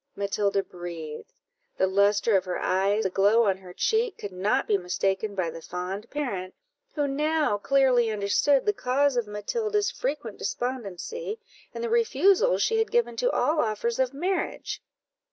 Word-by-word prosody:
Matilda 200 0 0
breathed; 170 -4 -8 0.5
the - - +3
lustre 200 +3 +3
of 190 -1 +2
her 180 - -2
eye, 195 +3 +1
the - - +1
glow 205 +5 +4
on 195 -3 +2
her 185 -1 -12
cheek, 445 - 0
could 205 - -6
not 205 +9 0
be 210 - +3
mistaken 195 +2 -1
by 175 -4 -1
the 165 +1 -9
fond 185 +6 -5
parent, 200 -11 -4 0.4
who 290 -2 +1
now 300 -5 +1
clearly 255 -1 +3
understood 215 +7 +2
the 415 - +3
cause 275 -4 +1
of 240 -3 0
Matilda's 415 - -1
frequent 295 - -4
despondency, 255 - -4 0.3
and - - -6
the 470 - -1
refusals 445 - +3
she 450 -1 +2
had 445 - +1
given 475 0 +1
to - - +2
all 310 -9 +1
offers 230 0 -1
of 260 -1 +2
marriage. 360 +7 -2
225 Hz, 160 wpm, -26 LUFS, 195-300 Hz, 0.5 s, glow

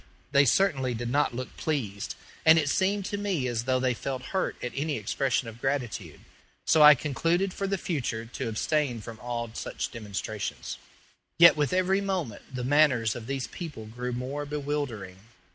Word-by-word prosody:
They 140 0 +5
certainly 135 - +2
did 120 +1 -3
not 145 -3 +2
look 130 +1 -6
pleased, 110 -11 -2 0.3
and 160 +1 +7
it 145 -3 +2
seemed 195 +4 +1
to 205 - -3
me 190 -10 -1
as 120 -1 -2
though 130 -1 +2
they 130 -1 +1
felt 130 +1 -4
hurt 190 - 0
at 125 - -2
any 145 0 -1
expression 120 +3 0
of 115 +1 -10
gratitude, 135 -5 -2 0.4
so 160 - +4
I 150 0 +10
concluded 165 +7 0
for 195 - -2
the 195 0 0
future 125 -10 -2
to 120 +1 -4
abstain 125 +1 0
from 110 +1 -9
all 120 -1 -4
such - - -4
demonstrations. 105 -2 -5 0.6
Yet 170 0 +9
with 150 -2 0
every 185 +2 +2
moment 185 - -2
the 125 -1 -4
manners 130 -5 +3
of 115 -1 -7
these 135 -2 -2
people 150 -6 -7
grew 125 +3 -5
more 130 +4 -3
bewildering. 140 -10 -4
135 Hz, 175 wpm, -28 LUFS, 120-155 Hz, 0.6 s, I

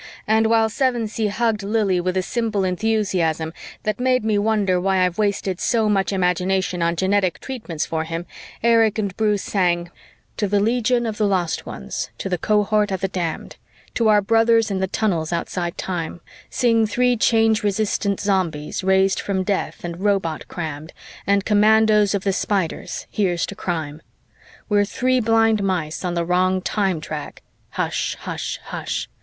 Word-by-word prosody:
And 220 +1 +3
while 225 0 +3
Sevensee 225 -2 0
hugged 220 +1 0
Lili 200 -3 +1
with 185 +1 -1
a 185 - +1
simple 225 -2 -1
enthusiasm 185 -5 0 0.3
that 215 +1 -2
made 255 -2 +1
me 215 -2 +2
wonder 205 -4 +1
why 190 -1 +2
I've 180 +2 -3
wasted 200 -3 0
so 225 -2 +1
much 200 -2 +1
imagination 185 -1 0
on 170 0 +1
genetic 190 0 +1
treatments 215 - -4
for 160 -1 -2
him, 165 +1 -5 0.4
Erich 225 -2 +4
and 200 -3 -2
Bruce 210 -2 +1
sang: 175 -3 0 0.5
"_To 205 - 0
the 205 +1 +2
legion 240 +3 +1
of 220 -2 -3
the 210 - +3
lost 180 -4 -1
ones, 65 -1 -5
to - - -4
the 180 -2 -1
cohort 210 +1 +2
of 190 -2 -3
the 195 - +1
damned, 175 -4 -4 0.4
To 230 - +1
our 210 -1 +4
brothers 225 0 +3
in 190 - -1
the 190 - 0
tunnels 175 -6 -1
outside 170 0 -3
time, 175 -2 -4 0.3
Sing 230 -3 +2
three 250 +3 +2
Change 225 -1 +3
resistant 205 -1 0
Zombies, 185 -6 -1
raised 190 0 +3
from 190 -2 -1
death 195 +1 -2
and 170 0 -5
robot 195 -6 0
crammed, 155 -2 -6 0.3
And 200 0 +2
Commandos 210 -1 +4
of 195 - -2
the 195 - +1
Spiders 190 -3 -2
Here's 180 -5 0
to - - -7
crime! 160 -5 -4 0.7
We're 205 -1 +3
three 255 +5 +1
blind 225 -2 +3
mice 180 -5 -2
on 175 -1 -2
the 170 0 0
wrong 185 +2 +2
time 190 -3 -1
track, 150 -1 -7 0.3
Hush - - -2
hush - - -4
hush! - - -4
200 Hz, 165 wpm, -21 LUFS, 180-220 Hz, 0.7 s, Erich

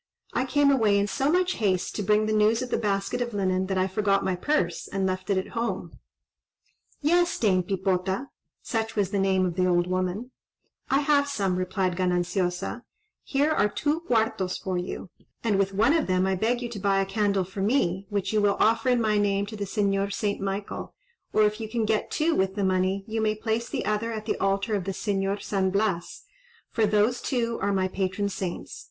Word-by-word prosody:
I 255 - +1
came 285 +1 +4
away 220 -7 +3
in 200 - +2
so 270 +8 0
much 365 +1 +1
haste, 190 -4 0
to - - -2
bring 210 +2 +3
the 215 - 0
news 215 +3 +3
of 250 - -7
the - - +2
basket 200 +2 -1
of 240 -3 -3
linen, 185 -1 0
that 190 -1 -1
I 185 - +3
forgot 195 +1 +1
my 185 - +1
purse, 180 - -1
and 195 -1 -1
left 185 0 -2
it 200 - +2
at 190 - -2
home." 230 0 -4 1.0
"Yes, 345 +4 +2
Dame 190 -5 +3
Pipota,"—such 195 +4 -3
was 200 -3 0
the 200 - 0
name 190 -1 +2
of 180 - -1
the 185 +1 +1
old 175 -1 +3
woman,—"I 185 +8 -3
have 285 -1 +3
some," 200 -10 0
replied 185 0 -1
Gananciosa; 180 +3 -1 0.4
"here 285 +3 +1
are 210 -9 +2
two 295 +8 0
cuartos 220 - 0
for 190 -1 -3
you, 180 0 -4 0.3
and 210 -4 +2
with 195 0 +1
one 225 +8 +3
of 325 -3 +1
them 185 0 +2
I 190 - +1
beg 235 +6 0
you 240 - -3
to 225 -3 -6
buy 195 0 +2
a 195 - +1
candle 200 -1 +1
for 190 +2 -6
me, 195 -4 +1
which 205 0 -2
you 215 - +3
will 200 -1 +2
offer 225 +3 +3
in 245 -1 +3
my 215 -2 +2
name 200 -1 +1
to 215 +2 -8
the 205 -1 -3
Señor 200 0 0
St. 200 -1 -2
Michael, 195 +1 -4 0.4
or 215 - +4
if 210 +1 +1
you 220 - -5
can 225 -1 0
get 215 0 0
two 325 +2 +1
with 190 -4 0
the 205 - -1
money, 190 +1 +1
you 220 0 -2
may 215 0 +1
place 225 +2 -2
the - - -3
other 215 +2 -1
at 215 -1 -5
the 220 - -1
altar 195 +2 0
of 195 -4 -1
the 195 - -2
Señor 195 0 -1
St. 190 -2 0
Blas, 195 -3 -1 0.5
for 225 -2 +2
those 215 +4 +2
two 235 -3 -1
are 200 - +1
my 190 -1 +1
patron 190 +2 -1
saints. 185 -3 -5
200 Hz, 210 wpm, -26 LUFS, 190-225 Hz, 1.0 s, came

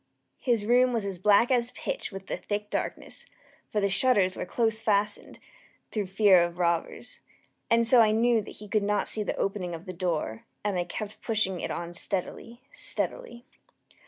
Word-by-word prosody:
His 235 -6 +1
room 250 +2 +4
was 225 -4 -1
as 195 -3 -4
black 210 +6 +4
as 245 -1 +2
pitch - - -4
with 195 -1 -8
the - - -3
thick 210 0 -4
darkness, - - -4 0.4
(for 210 - 0
the 200 - +2
shutters 200 -2 +3
were - - -5
close 225 +1 0
fastened, 210 -2 0 0.5
through 210 -3 -2
fear 190 -1 +5
of 170 0 -1
robbers,) 170 -2 -1 0.5
and 230 0 +4
so 235 +1 +6
I 220 - +5
knew 230 +1 +3
that - - -10
he 210 - -9
could 215 +1 +1
not 205 0 0
see 215 - +1
the 210 - -2
opening 185 -3 -2
of 165 - -10
the 185 - -6
door, 165 - -2 0.2
and 205 -2 -1
I 175 - -1
kept 215 +4 -6
pushing 210 -5 0
it - - -3
on 170 0 -4
steadily, 205 +7 -4
steadily. 245 - -4
210 Hz, 185 wpm, -28 LUFS, 185-230 Hz, 0.5 s, so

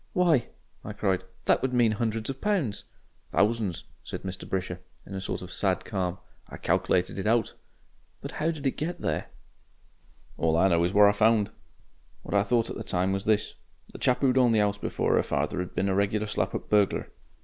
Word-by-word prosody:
"Why!" 170 -9 +3 0.4
I 105 - -6
cried, 95 -3 0 0.2
"that - - +3
would 130 -1 -1
mean 120 -3 +4
hundreds 110 0 -2
of 135 - -10
pounds." 185 - 0 0.5
"Thousands," 105 -5 +1 0.2
said - - -7
Mr. 95 -1 -6
Brisher, 90 -2 -2 0.3
in - - -10
a 95 - -4
sort 95 - -4
of 90 - -8
sad 95 -2 0
calm. 95 -3 -2 0.3
"I - - -8
calc'lated 90 +2 +1
it 95 - -2
out." 115 -1 +2 0.7
"But - - -7
how 160 - -1
did 155 -4 -4
they 135 - +2
get 170 +6 -4
there?" - - -1 1.1
"All 80 0 +2
I 95 +3 +4
know 85 -1 +3
is 85 - +1
what 105 +1 +6
I - - +6
found. 105 0 +3 0.7
What - - -6
I 100 - +5
thought 115 +2 +1
at - - -5
the - - -5
time 90 +1 0
was 95 0 -3
this. 105 -1 +1 0.4
The - - -10
chap 125 - +2
who'd 130 -1 +4
owned 120 -3 +4
the 110 - +4
'ouse 100 0 0
before - - +1
'er - - +4
father 90 - -1
'd 90 - -11
been 95 - +1
a 95 - +1
regular 100 +2 +1
slap 105 - -1
up - - -5
burglar. 105 -2 +2
105 Hz, 205 wpm, -27 LUFS, 95-120 Hz, 1.1 s, what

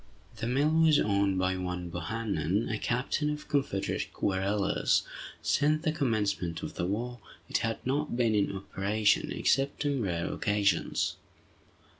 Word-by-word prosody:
The 115 - -3
mill 140 +5 +2
was 160 -2 +5
owned 100 -2 +2
by 95 0 +1
one 90 -1 -4
Bohannan, 100 0 -1
a 105 - -2
captain 135 +5 0
of 150 0 -4
Confederate 135 -9 -1
guerrillas. 100 +1 +1 0.4
Since 155 +2 +2
the 160 - +2
commencement 105 - -1
of - - -5
the 85 - -2
war, 120 +5 -3 0.3
it - - +1
had 115 -1 -1
not 140 0 -1
been 115 -3 +3
in 105 -2 +2
operation, 100 +2 0
except 140 +2 +1
on 140 -3 +1
rare 85 -5 -1
occasions. 100 -4 +1
105 Hz, 140 wpm, -30 LUFS, 95-135 Hz, 0.4 s, was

